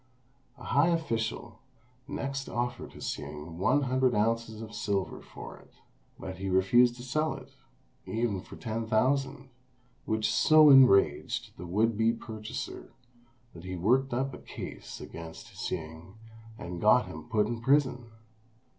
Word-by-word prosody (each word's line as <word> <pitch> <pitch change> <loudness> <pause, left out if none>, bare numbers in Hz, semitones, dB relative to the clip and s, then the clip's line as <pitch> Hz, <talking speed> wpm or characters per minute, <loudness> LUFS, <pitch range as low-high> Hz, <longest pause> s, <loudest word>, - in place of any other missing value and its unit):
A - - -13
high 145 +4 +3
official 120 -8 -2 0.5
next 135 -1 -4
offered 120 0 -3
Hsing 75 +3 -6
one 145 +9 +3
hundred 130 -1 +2
ounces 115 +1 0
of 110 -1 -8
silver 100 -2 -2
for - - -10
it; - - -22 0.4
but 95 0 -7
he 95 0 -3
refused 120 +7 +4
to 120 - -10
sell 155 +5 -1
it - - -12 0.6
even 110 -4 -1
for - - -12
ten 115 0 -4
thousand, 135 +3 0 0.5
which 110 -1 0
so 155 -1 +7
enraged 130 -8 +5
the 90 - -8
would 110 +4 +1
be 115 +1 +3
purchaser 110 -2 -7 0.6
that 85 - -11
he 95 0 -5
worked 125 +10 +2
up 130 +2 -1
a - - -8
case - - -8
against 80 -1 -10
Hsing, 80 +2 -6 0.4
and 85 -3 -6
got 115 +4 +5
him 120 - -10
put 105 -3 +2
in 115 +1 -4
prison. 130 -2 +2
115 Hz, 140 wpm, -29 LUFS, 100-130 Hz, 0.6 s, so